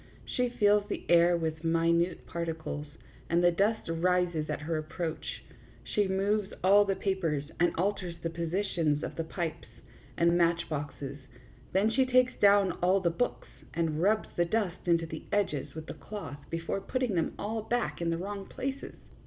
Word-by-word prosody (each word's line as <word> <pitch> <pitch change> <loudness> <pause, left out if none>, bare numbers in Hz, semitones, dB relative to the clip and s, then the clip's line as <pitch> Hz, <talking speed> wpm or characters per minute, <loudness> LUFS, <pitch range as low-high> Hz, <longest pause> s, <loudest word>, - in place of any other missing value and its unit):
She 250 -1 0
fills 205 -3 +3
the - - -4
air 175 0 +6
with 160 -1 -3
minute 165 +1 +2
particles, 160 -3 -4 0.4
and 170 +1 +3
the 175 - +6
dust 205 +6 +1
rises 170 -1 +1
at 150 - -2
her 160 +2 -2
approach; 160 +1 -4 0.4
she 205 -2 +1
moves 195 +2 0
all 200 +2 +6
the 195 -1 0
papers, 165 -8 -1
and 175 0 +3
alters 185 -1 -1
the 165 - -1
positions 170 -3 0
of - - -4
the 165 - -2
pipes 165 -3 -4 0.5
and 170 0 +4
match 170 -1 +2
boxes; 145 -2 -5 0.5
then 200 +4 +3
she 260 +3 +3
takes 255 0 +4
down 200 -2 +5
all 185 +2 +4
the 175 -3 +1
books, 245 +9 -2 0.3
and 160 -2 0
rubs 215 +4 +2
the 175 - +2
dust 185 -2 -1
into 170 -1 +3
the 160 -1 -7
edges 185 -11 -1
with 160 0 -6
the - - -6
cloth 160 -10 -8
before 165 +4 -2
putting 255 +1 -1
them 165 -3 0
all 220 +2 -2
back 235 -3 -1
in 170 - 0
the 165 - 0
wrong 195 +2 -5
places. 270 +1 -5
175 Hz, 170 wpm, -30 LUFS, 165-205 Hz, 0.5 s, air